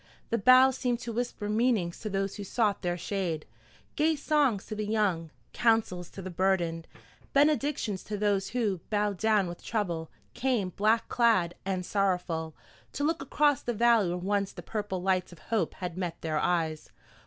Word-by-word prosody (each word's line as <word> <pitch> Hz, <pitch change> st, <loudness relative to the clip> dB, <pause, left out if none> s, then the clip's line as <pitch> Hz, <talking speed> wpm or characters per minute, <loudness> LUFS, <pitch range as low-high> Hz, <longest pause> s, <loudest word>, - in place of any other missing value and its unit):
The 230 Hz, -, +1 dB
boughs 255 Hz, +4 st, +6 dB
seemed 245 Hz, -2 st, 0 dB
to 235 Hz, -1 st, -5 dB
whisper 235 Hz, -3 st, -3 dB
meanings 215 Hz, -5 st, +1 dB
to 215 Hz, -, -4 dB
those 195 Hz, 0 st, -2 dB
who 205 Hz, -, -5 dB
sought 210 Hz, 0 st, 0 dB
their 175 Hz, -1 st, -1 dB
shade, 175 Hz, -4 st, -3 dB, 0.5 s
gay 315 Hz, +2 st, +2 dB
songs 285 Hz, -8 st, +1 dB
to 215 Hz, -, -6 dB
the 210 Hz, 0 st, -3 dB
young, 200 Hz, -7 st, 0 dB, 0.2 s
counsels 220 Hz, -7 st, +1 dB
to 195 Hz, -, -9 dB
the 185 Hz, -, -6 dB
burdened, 170 Hz, -3 st, 0 dB, 0.5 s
benedictions 280 Hz, -8 st, +2 dB
to 210 Hz, -, -4 dB
those 200 Hz, -2 st, +1 dB
who, 215 Hz, -6 st, -1 dB
bowed 205 Hz, -3 st, 0 dB
down 215 Hz, -3 st, +3 dB
with 175 Hz, -1 st, -7 dB
trouble, 175 Hz, -8 st, -2 dB, 0.2 s
came, 240 Hz, -8 st, 0 dB
black 215 Hz, +5 st, +1 dB
clad 220 Hz, -8 st, +3 dB
and 185 Hz, -2 st, -1 dB
sorrowful, 180 Hz, -5 st, -1 dB, 0.4 s
to 285 Hz, -, -3 dB
look 325 Hz, +2 st, 0 dB
across 290 Hz, 0 st, +2 dB
the 240 Hz, -, -3 dB
valley 230 Hz, -3 st, +4 dB
where 175 Hz, -, -2 dB
once 200 Hz, +2 st, -1 dB
the -, -, -9 dB
purple 205 Hz, -4 st, -3 dB
lights 185 Hz, -1 st, +1 dB
of 175 Hz, -, -12 dB
hope 185 Hz, +2 st, -2 dB
had 180 Hz, -3 st, -5 dB
met 175 Hz, -3 st, -3 dB
their 155 Hz, -2 st, -1 dB
eyes. 160 Hz, -3 st, -1 dB
205 Hz, 175 wpm, -29 LUFS, 180-230 Hz, 0.5 s, boughs